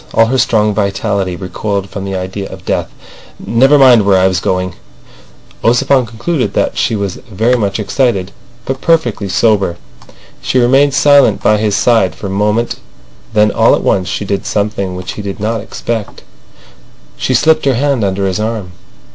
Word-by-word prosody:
All 115 Hz, -, +5 dB
her 130 Hz, +3 st, 0 dB
strong 105 Hz, -3 st, +2 dB
vitality 100 Hz, -2 st, -1 dB
recoiled 100 Hz, +2 st, -4 dB
from 100 Hz, 0 st, -7 dB
the 95 Hz, -1 st, -4 dB
idea 95 Hz, +1 st, -5 dB
of -, -, -11 dB
death. -, -, -1 dB, 0.5 s
"Never 135 Hz, +5 st, +3 dB
mind 130 Hz, -5 st, +6 dB
where 100 Hz, -1 st, +3 dB
I 95 Hz, 0 st, +4 dB
was 95 Hz, -1 st, 0 dB
going... 90 Hz, +1 st, -2 dB, 0.5 s
." -, -, -27 dB
Ossipon 125 Hz, +2 st, +2 dB
concluded 125 Hz, +6 st, -2 dB
that -, -, 0 dB
she 115 Hz, -, 0 dB
was 100 Hz, -3 st, -3 dB
very 110 Hz, +5 st, +1 dB
much 100 Hz, -3 st, -1 dB
excited 105 Hz, -4 st, 0 dB, 0.3 s
but 135 Hz, 0 st, -4 dB
perfectly 120 Hz, -12 st, 0 dB
sober. 100 Hz, -4 st, +1 dB, 0.6 s
She -, -, -1 dB
remained 135 Hz, +3 st, +3 dB
silent 140 Hz, -8 st, +4 dB
by 105 Hz, -, +4 dB
his 105 Hz, -1 st, 0 dB
side 110 Hz, -8 st, +2 dB
for 100 Hz, -, -6 dB
moment, 105 Hz, +4 st, -1 dB, 0.6 s
then 105 Hz, 0 st, +4 dB
all -, -, +3 dB
at -, -, -4 dB
once 95 Hz, -2 st, +1 dB
she 100 Hz, -, -3 dB
did 100 Hz, 0 st, -3 dB
something 100 Hz, -3 st, -2 dB
which 90 Hz, -1 st, -6 dB
he -, -, -7 dB
did 100 Hz, 0 st, -6 dB
not 110 Hz, +1 st, -2 dB
expect. 115 Hz, 0 st, -5 dB, 0.9 s
She -, -, -1 dB
slipped 155 Hz, -1 st, +3 dB
her 135 Hz, -2 st, +2 dB
hand 135 Hz, -2 st, 0 dB
under 100 Hz, 0 st, -1 dB
his 95 Hz, +1 st, -1 dB
arm. 110 Hz, -4 st, -3 dB
105 Hz, 170 wpm, -13 LUFS, 95-120 Hz, 0.9 s, mind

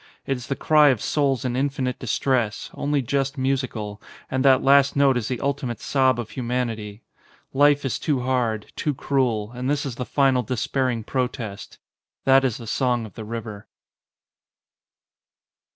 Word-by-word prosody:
It 135 Hz, -, 0 dB
is 125 Hz, -1 st, -8 dB
the 140 Hz, -, -1 dB
cry 150 Hz, 0 st, +5 dB
of 130 Hz, -5 st, +2 dB
souls 135 Hz, -2 st, 0 dB
in 125 Hz, -1 st, -1 dB
infinite 130 Hz, -2 st, -1 dB
distress, 120 Hz, -2 st, -1 dB
only 145 Hz, -1 st, -1 dB
just 135 Hz, +3 st, -1 dB
musical, 130 Hz, -6 st, -2 dB, 0.3 s
and 130 Hz, 0 st, 0 dB
that 135 Hz, -2 st, +5 dB
last 140 Hz, 0 st, +5 dB
note 140 Hz, -2 st, +4 dB
is 120 Hz, -3 st, -1 dB
the 125 Hz, -2 st, -3 dB
ultimate 140 Hz, -4 st, -2 dB
sob 130 Hz, -3 st, +2 dB
of 115 Hz, -2 st, -5 dB
humanity. 115 Hz, -4 st, -3 dB, 0.5 s
Life 145 Hz, +1 st, +4 dB
is 130 Hz, -, -1 dB
too 145 Hz, -5 st, 0 dB
hard, 120 Hz, -4 st, -1 dB
too 150 Hz, -2 st, -1 dB
cruel, 120 Hz, -6 st, 0 dB
and 125 Hz, +2 st, -4 dB
this 145 Hz, 0 st, 0 dB
is 125 Hz, -4 st, -5 dB
the 125 Hz, -, -2 dB
final 135 Hz, -2 st, +2 dB
despairing 125 Hz, 0 st, -1 dB
protest. 125 Hz, -4 st, -4 dB, 0.5 s
That 135 Hz, 0 st, +6 dB
is 125 Hz, -5 st, 0 dB
the 115 Hz, -, -9 dB
song 120 Hz, 0 st, 0 dB
of 110 Hz, -, -12 dB
the 110 Hz, -, -8 dB
river. 110 Hz, -2 st, -7 dB
130 Hz, 160 wpm, -23 LUFS, 115-135 Hz, 0.5 s, That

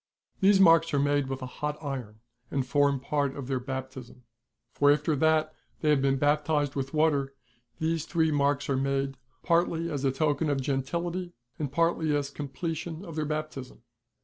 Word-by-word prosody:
These 195 Hz, 0 st, +5 dB
marks 165 Hz, -4 st, +5 dB
are -, -, +3 dB
made 145 Hz, -1 st, +1 dB
with 135 Hz, -1 st, -4 dB
a 125 Hz, -, -7 dB
hot 150 Hz, 0 st, -1 dB
iron, 125 Hz, -8 st, -6 dB, 0.3 s
and 135 Hz, -2 st, -1 dB
form 140 Hz, 0 st, +2 dB
part 140 Hz, 0 st, -1 dB
of 140 Hz, -, -6 dB
their 135 Hz, -1 st, -1 dB
baptism; 130 Hz, -1 st, -7 dB, 0.5 s
for 145 Hz, +2 st, +4 dB
after 150 Hz, +1 st, +1 dB
that 155 Hz, +1 st, +2 dB, 0.3 s
they 155 Hz, -, +3 dB
have 145 Hz, -2 st, +3 dB
been 135 Hz, 0 st, +2 dB
baptised 145 Hz, 0 st, +1 dB
with 135 Hz, -1 st, -3 dB
water, 145 Hz, -3 st, +1 dB, 0.4 s
these 160 Hz, 0 st, -1 dB
three 160 Hz, -2 st, +1 dB
marks 145 Hz, -1 st, +1 dB
are 135 Hz, -, +1 dB
made, 135 Hz, 0 st, -1 dB, 0.3 s
partly 170 Hz, -1 st, +1 dB
as 145 Hz, -2 st, -3 dB
a 135 Hz, -, +3 dB
token 145 Hz, +2 st, 0 dB
of 140 Hz, -1 st, +1 dB
gentility, 170 Hz, +7 st, -2 dB, 0.3 s
and 145 Hz, -4 st, -2 dB
partly 165 Hz, -1 st, +1 dB
as 145 Hz, -1 st, -2 dB
the -, -, -27 dB
completion 160 Hz, +4 st, -4 dB
of 165 Hz, -, -8 dB
their 155 Hz, -1 st, -1 dB
baptism. 150 Hz, -5 st, -5 dB
145 Hz, 175 wpm, -28 LUFS, 135-160 Hz, 0.5 s, These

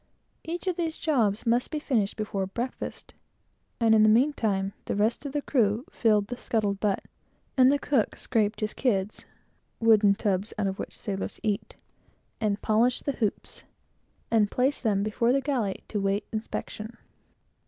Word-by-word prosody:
Each 340 Hz, +3 st, -5 dB
of 365 Hz, -2 st, -1 dB
these 325 Hz, -2 st, -2 dB
jobs 225 Hz, -10 st, +1 dB
must 240 Hz, +2 st, +2 dB
be 310 Hz, -, -3 dB
finished 235 Hz, -9 st, 0 dB
before 200 Hz, -3 st, -2 dB
breakfast; 240 Hz, +6 st, -5 dB, 0.7 s
and, 225 Hz, -2 st, +4 dB
in 220 Hz, -, +6 dB
the 215 Hz, -, +6 dB
meantime, 215 Hz, -6 st, +2 dB
the -, -, -2 dB
rest 220 Hz, +7 st, 0 dB
of -, -, -6 dB
the 290 Hz, 0 st, -2 dB
crew 230 Hz, -2 st, +1 dB
filled 215 Hz, -3 st, +2 dB
the 245 Hz, +3 st, -7 dB
scuttle 215 Hz, -3 st, 0 dB
butt, 200 Hz, 0 st, -1 dB, 0.5 s
and 260 Hz, 0 st, +6 dB
the 285 Hz, -, +3 dB
cook 275 Hz, -6 st, 0 dB
scraped 220 Hz, -2 st, 0 dB
his 215 Hz, 0 st, -1 dB
kids 210 Hz, -5 st, -1 dB, 0.5 s
(wooden 215 Hz, -3 st, +5 dB
tubs 200 Hz, 0 st, -1 dB
out 210 Hz, -, 0 dB
of 195 Hz, 0 st, -2 dB
which -, -, -6 dB
the -, -, -14 dB
sailors 195 Hz, -3 st, -4 dB
eat) 210 Hz, -2 st, -2 dB, 0.6 s
and 210 Hz, -2 st, -1 dB
polished 230 Hz, +3 st, +2 dB
the 280 Hz, -, +1 dB
hoops, 210 Hz, -3 st, -2 dB, 0.7 s
and 215 Hz, -3 st, +4 dB
placed 260 Hz, +5 st, +1 dB
them 205 Hz, -4 st, +1 dB
before 230 Hz, +3 st, +1 dB
the 275 Hz, -, +3 dB
galley, 255 Hz, -8 st, -2 dB
to 210 Hz, -, -1 dB
await 195 Hz, +1 st, 0 dB
inspection. 220 Hz, +1 st, -5 dB
220 Hz, 165 wpm, -27 LUFS, 205-250 Hz, 0.7 s, in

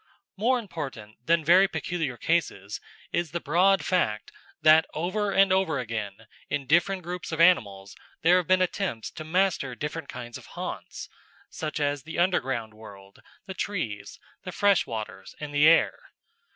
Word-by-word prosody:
More 240 Hz, +6 st, +2 dB
important 135 Hz, -, -7 dB
than 165 Hz, -1 st, +3 dB
very 185 Hz, +4 st, +6 dB
peculiar 160 Hz, -10 st, -3 dB
cases 110 Hz, -, -1 dB, 0.3 s
is 170 Hz, -2 st, -1 dB
the 170 Hz, -, -1 dB
broad 180 Hz, +6 st, +3 dB
fact 115 Hz, -, 0 dB, 0.3 s
that 155 Hz, +1 st, +6 dB
over 200 Hz, +6 st, -1 dB
and 195 Hz, -1 st, +4 dB
over 190 Hz, -6 st, +1 dB
again 110 Hz, -4 st, -5 dB, 0.2 s
in 145 Hz, -2 st, -2 dB
different 175 Hz, +6 st, +2 dB
groups 180 Hz, +1 st, -6 dB
of 160 Hz, -, -4 dB
animals 100 Hz, -, +3 dB, 0.3 s
there 175 Hz, +3 st, +6 dB
have 180 Hz, -3 st, -1 dB
been 185 Hz, 0 st, +4 dB
attempts 180 Hz, -, -3 dB
to 155 Hz, -, -8 dB
master 165 Hz, -6 st, 0 dB
different 150 Hz, +5 st, -5 dB
kinds 120 Hz, -1 st, -7 dB
of -, -, -16 dB
haunts -, -, -6 dB, 0.4 s
such 155 Hz, -1 st, -4 dB
as 145 Hz, -1 st, 0 dB
the 160 Hz, +5 st, -8 dB
underground 135 Hz, -, 0 dB
world, 100 Hz, -2 st, -14 dB, 0.3 s
the 190 Hz, -, -6 dB
trees, 170 Hz, -, -4 dB, 0.2 s
the -, -, -7 dB
freshwaters, 170 Hz, -, -1 dB
and 150 Hz, -1 st, -6 dB
the 145 Hz, +1 st, +5 dB
air. 165 Hz, -, +4 dB
160 Hz, 150 wpm, -26 LUFS, 120-180 Hz, 0.4 s, very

